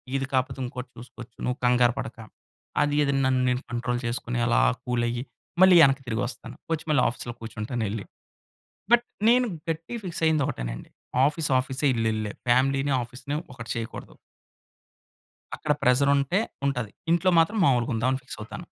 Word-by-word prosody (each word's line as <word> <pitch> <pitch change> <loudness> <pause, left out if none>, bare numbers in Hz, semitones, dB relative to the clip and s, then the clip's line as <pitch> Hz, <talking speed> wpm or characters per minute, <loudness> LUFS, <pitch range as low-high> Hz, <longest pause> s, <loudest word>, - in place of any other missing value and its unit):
ఇది 135 0 0
కాకపోతే 130 0 0
ఇంకోటి 125 0 -7
చూసుకోవచ్చు. 120 0 -12
నువ్వు 125 +2 -1
కంగారు 125 -1 +4
పడక! 125 -2 -6 0.7
అది, 145 0 0
అది 140 - +1
నన్ను 130 -1 +2
నేను 125 +1 0
కంట్రోల్ 120 0 -1
చేసుకొని, 120 0 -2
అలా - - +3 0.2
కూల్ 120 -1 0
అయ్యి, 120 +1 -3 0.4
మళ్ళి 185 -1 +8
ఎనక్కి 135 0 -1
తిరిగి 115 0 -1
వస్తాను. 125 0 -9 0.2
వచ్చి 160 - -4
మళ్ళి 145 -4 +4
ఆఫీస్‌లో 120 0 -5
కూర్చుంటాను 115 +1 -4
ఎళ్లి. 105 -1 -4 0.9
బట్ 240 0 +6 0.3
నేను 250 +1 +4 0.2
గట్టిగా 165 +9 -4
ఫిక్స్ 170 -3 -5
అయ్యింది 155 -3 +3
ఒకటేనండి! - - -5 0.4
ఆఫీస్, 150 +1 -1
ఆఫీసే! 130 +2 -3
ఇల్లు 115 -1 +1
ఇల్లే! 105 -1 -3 0.2
ఫ్యామిలీని, 135 +3 +3
ఆఫీస్‌ని 125 +5 -5 0.2
ఒకటి 115 -2 -9
చేయకూడదు. 115 -1 -6 1.4
అక్కడ 150 - 0
ప్రెజరుంటే 140 - +3 0.3
ఉంటది. 125 -6 -1 0.2
ఇంట్లో 175 +2 +3
మాత్రం 210 +7 +1
మాములుగా 125 -4 +2
ఉందాం, 120 +3 +1
అని 130 - -2
ఫిక్స్ 125 - -9
అవుతాను. 105 - -8
125 Hz, 155 wpm, -26 LUFS, 120-140 Hz, 1.4 s, మళ్ళి